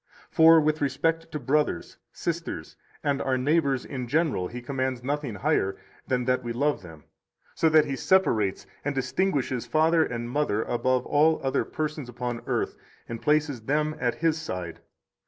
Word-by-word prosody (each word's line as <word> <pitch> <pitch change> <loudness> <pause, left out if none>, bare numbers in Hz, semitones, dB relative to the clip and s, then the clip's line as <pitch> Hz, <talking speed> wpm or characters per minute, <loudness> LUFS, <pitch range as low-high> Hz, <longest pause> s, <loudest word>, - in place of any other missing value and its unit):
For 165 0 +7
with 155 0 +1
respect 165 +4 0
to 155 - -3
brothers, 145 - 0
sisters, 165 - -4 0.3
and 140 -1 0
our 130 -1 +1
neighbors 140 -1 +1
in 130 -3 -5
general 145 - +1
He 125 - -7
commands 130 -1 -3
nothing 140 -4 -2
higher 95 0 0 0.3
than 125 -1 0
that 125 0 +1
we 120 -1 -3
love 145 +4 0
them, 80 -4 -12 0.5
so 160 - +2
that 155 -1 +5
He 140 -2 -3
separates 115 - +2 0.2
and 145 0 -2
distinguishes 130 -3 -1
father 160 +5 +3
and 120 -4 -4
mother 120 -5 0
above 130 +1 0
all 155 +2 +3
other 135 - +1
persons 155 -4 -4
upon 120 -1 -4
earth, - - -1 0.3
and 115 -1 -6
places 150 -4 +1
them 150 +5 0
at 120 -2 0
His 160 -1 0
side. 90 - -5
135 Hz, 160 wpm, -26 LUFS, 120-155 Hz, 0.5 s, For